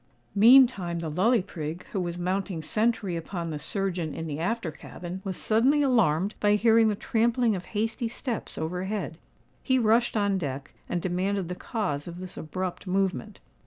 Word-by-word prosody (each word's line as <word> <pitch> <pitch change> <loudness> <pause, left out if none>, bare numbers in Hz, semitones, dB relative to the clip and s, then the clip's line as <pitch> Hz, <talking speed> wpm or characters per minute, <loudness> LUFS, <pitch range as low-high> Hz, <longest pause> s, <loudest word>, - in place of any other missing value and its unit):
Meantime 220 -5 +6
the 165 -2 -3
Lully 210 +6 +3
Prig, 165 -2 -6
who 200 - -1
was 175 -1 -3
mounting 185 -1 -2
sentry 215 -1 0
upon 170 0 -4
the 150 - -4
surgeon 175 -1 -2
in 165 - -4
the 150 -1 -4
after 180 0 -1
cabin, 175 +4 -8
was 190 -2 -4
suddenly 260 +7 +3
alarmed 200 - +2
by 205 0 +4
hearing 225 +1 +5
the 210 - +1
trampling 230 +1 +1
of 180 - -6
hasty 225 +3 -2
steps 235 0 -5
over 180 +4 -3
head. 190 -5 -4 0.4
He 260 -1 +2
rushed 230 0 +3
on 200 -2 +1
deck, 140 -3 -5 0.2
and 175 - -2
demanded 185 0 -1
the - - -2
cause 180 - -3
of 170 0 -7
this 185 -1 -8
abrupt 185 +4 -5
movement. 195 +2 -1
190 Hz, 170 wpm, -27 LUFS, 175-225 Hz, 0.4 s, Meantime